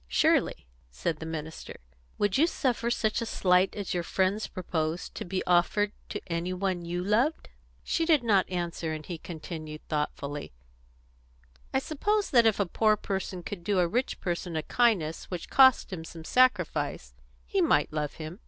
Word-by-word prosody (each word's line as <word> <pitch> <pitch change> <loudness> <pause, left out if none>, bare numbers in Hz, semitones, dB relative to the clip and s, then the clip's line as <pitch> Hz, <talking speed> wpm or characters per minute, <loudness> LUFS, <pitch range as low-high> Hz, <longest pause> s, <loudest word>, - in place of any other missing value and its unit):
"Surely," 65 - +2 0.2
said 65 - -2
the 160 - -6
minister. 160 0 -6 0.4
"Would 205 -2 +1
you 310 +5 +5
suffer 245 -7 0
such 225 -1 0
a - - -1
slight 180 -2 +2
as 205 -2 -3
your 175 - 0
friends 190 +4 0
propose, 165 -2 -3
to - - -6
be 185 +1 -3
offered 180 +4 +3 0.2
to - - -3
any 170 +1 -2
one 185 -1 -1
you 175 +1 -2
loved?" 235 - +1 0.3
She 330 -1 0
did 310 -6 +4
not 200 -5 +3
answer, 170 -3 -3
and 155 -1 -6
he 170 -2 -6
continued, 155 -2 -8
thoughtfully: 145 - -3 1.2
"I - - +1
suppose 400 +10 0
that 235 -3 +6
if 220 - +2
a 200 - +3
poor 215 +4 +2
person 190 -2 -4
could 180 -2 -6
do 200 +2 0
a 180 -1 +4
rich 245 +9 -1
person 175 -2 -3
a 155 - -1
kindness 190 -10 +1
which 180 -3 -6
cost 260 -6 +6
him 165 -3 -5
some 165 0 -10
sacrifice, 160 - +1 0.3
he 60 - 0
might - - +2
love 150 -2 -2
him. 160 +4 -8
180 Hz, 170 wpm, -28 LUFS, 160-215 Hz, 1.2 s, that